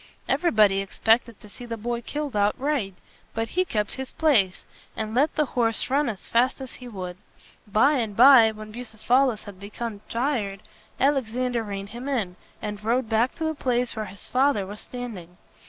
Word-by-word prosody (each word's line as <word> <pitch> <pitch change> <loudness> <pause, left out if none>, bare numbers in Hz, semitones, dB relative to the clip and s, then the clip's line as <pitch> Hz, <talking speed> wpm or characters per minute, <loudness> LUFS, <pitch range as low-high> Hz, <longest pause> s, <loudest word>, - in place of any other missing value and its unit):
Everybody 215 - +3
expected 225 +3 +1
to - - -12
see 210 - -10
the 230 -1 -4
boy 235 +2 -3
killed 290 +1 -4
outright. 210 0 0 0.4
But 225 0 -1
he 370 - +1
kept 210 - -2
his 265 -1 -6
place, 220 - +2 0.3
and 215 0 -3
let 285 +6 +2
the 305 - +2
horse 235 -1 0
run 285 0 +2
as 200 -5 -6
fast 250 +4 +2
as 265 -2 -7
he 250 - -10
would. 185 -5 -6 0.5
By 265 +9 +4
and 215 -4 -3
by, 250 -2 +9
when 215 0 -8
Bucephalus 240 +1 +1
had 200 -3 -11
become 210 +1 -6
tired, 230 -6 -1 0.4
Alexander 250 -3 +1
reined 200 -2 -5
him 245 +5 -6
in, 215 -10 -1 0.3
and 210 -1 -5
rode 235 +1 +1
back 230 +3 +2
to 325 - -5
the 315 0 0
place 250 -4 0
where 215 -1 -3
his 195 -1 -7
father 255 -6 +2
was 205 +2 -8
standing. 205 -9 -8
230 Hz, 175 wpm, -25 LUFS, 210-255 Hz, 0.5 s, by